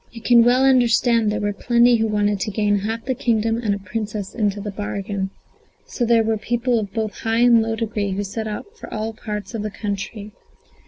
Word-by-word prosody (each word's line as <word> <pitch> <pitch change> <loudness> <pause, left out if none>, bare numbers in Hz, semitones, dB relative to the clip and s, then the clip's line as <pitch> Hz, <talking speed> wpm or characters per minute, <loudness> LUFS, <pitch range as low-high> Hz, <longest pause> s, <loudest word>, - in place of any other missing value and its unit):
You 235 - -10
can 235 -1 +6
well 250 +3 +4
understand 240 -3 +3
there 210 - -1
were 205 -1 -1
plenty 240 +3 +3
who 225 0 +1
wanted 205 -1 +1
to 215 - -2
gain 205 -1 +1
half 220 +3 -4
the 260 - 0
kingdom, 230 -2 0
and 210 -4 0
a - - -4
princess 205 +1 -5
into 205 -3 -1
the 205 0 -5
bargain; 200 -1 -4 0.6
so 240 - -2
there 230 -1 +4
were 220 0 0
people 240 +1 0
of 205 -3 -5
both 220 -1 -3
high 225 +1 0
and 240 -2 +6
low 225 0 -1
degree 215 -3 -2
who 200 +2 -2
set 220 +3 -4
out 210 -1 -5
for - - -10
all 220 +1 -3
parts 210 0 -6
of 225 - -3
the 210 - -3
country. 205 0 -5
220 Hz, 215 wpm, -21 LUFS, 205-235 Hz, 0.6 s, can